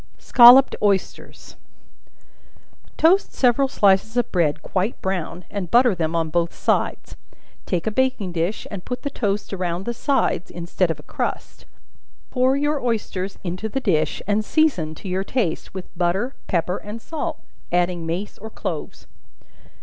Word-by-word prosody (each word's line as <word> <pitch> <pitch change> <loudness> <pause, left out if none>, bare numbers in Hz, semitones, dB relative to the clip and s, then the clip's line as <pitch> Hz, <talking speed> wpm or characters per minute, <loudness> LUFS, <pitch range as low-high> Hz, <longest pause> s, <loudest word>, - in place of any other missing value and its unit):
Scolloped 250 +2 +7
Oysters. 200 -3 -2 1.4
Toast 360 +5 +3
several 260 +2 +3
slices 215 -1 +2
of 245 - 0
bread 155 -4 +1
quite 195 +4 -2
brown, 180 -2 -3
and 195 -4 -4
butter 245 +1 +5
them 165 -2 -2
on 165 -1 -1
both 170 +1 0
sides; - - -1 0.5
take 180 -3 -1
a 220 - 0
baking 250 -5 0
dish, 175 +5 -2
and 195 -3 -6
put 250 0 -5
the 285 - -3
toast 205 -5 -2
around 180 -1 -3
the 235 - -2
sides, 235 - 0
instead 175 +1 -1
of 160 - -2
a - - -13
crust. - - -5 0.7
Pour 255 +1 +2
your 295 0 0
oysters 205 -5 -2
into 185 +4 -4
the 270 - -2
dish, 155 - 0
and 210 +1 +1
season, 215 - +1
to 195 - -10
your 185 +1 -1
taste, 195 -6 -2
with 190 0 -8
butter, 185 +9 0
pepper 180 +1 0
and 210 +2 -8
salt, 315 +6 -5 0.3
adding 175 -1 +1
mace 175 +5 -4
or 220 - -8
cloves. - - -6
195 Hz, 150 wpm, -22 LUFS, 175-245 Hz, 1.4 s, Scolloped